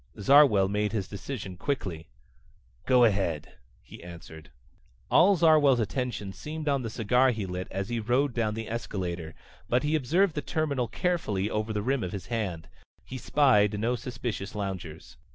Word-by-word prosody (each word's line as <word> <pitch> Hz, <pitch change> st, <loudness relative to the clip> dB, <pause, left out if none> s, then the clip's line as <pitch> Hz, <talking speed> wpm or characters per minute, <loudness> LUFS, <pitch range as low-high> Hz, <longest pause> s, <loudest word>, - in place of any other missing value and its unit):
Zarwell 115 Hz, -4 st, +6 dB
made 105 Hz, +1 st, -1 dB
his 100 Hz, -4 st, -2 dB
decision 100 Hz, -3 st, -7 dB
quickly. 90 Hz, -, -3 dB, 0.8 s
"Go 125 Hz, -2 st, +5 dB
ahead," 95 Hz, -9 st, 0 dB, 0.3 s
he -, -, -13 dB
answered. 80 Hz, -3 st, -11 dB, 0.6 s
All 195 Hz, +4 st, +6 dB
Zarwell's 155 Hz, -6 st, +5 dB
attention 115 Hz, -4 st, -3 dB
seemed 155 Hz, +5 st, -7 dB
on 140 Hz, -2 st, +2 dB
the 115 Hz, -, -4 dB
cigar 125 Hz, +4 st, +2 dB
he 110 Hz, -5 st, -2 dB
lit 90 Hz, 0 st, -5 dB
as 95 Hz, +2 st, -4 dB
he 120 Hz, -1 st, -1 dB
rode 125 Hz, +5 st, +1 dB
down 110 Hz, -3 st, -1 dB
the 110 Hz, -1 st, -5 dB
escalator, 90 Hz, -7 st, -4 dB, 0.3 s
but 125 Hz, +1 st, +2 dB
he 150 Hz, +1 st, 0 dB
surveyed 175 Hz, +7 st, +2 dB
the 150 Hz, -, -3 dB
terminal 145 Hz, -7 st, -1 dB
carefully 110 Hz, -, -1 dB
over 105 Hz, +1 st, -2 dB
the 105 Hz, -1 st, -2 dB
rim 135 Hz, +2 st, 0 dB
of 90 Hz, -, -4 dB
his 100 Hz, -, -5 dB
hand. 90 Hz, -8 st, -3 dB, 0.4 s
He 130 Hz, -, -7 dB
spied 105 Hz, -6 st, +3 dB
no 120 Hz, +3 st, 0 dB
suspicious 120 Hz, -4 st, -5 dB
loungers. 95 Hz, -6 st, -6 dB
110 Hz, 160 wpm, -28 LUFS, 95-135 Hz, 0.8 s, Zarwell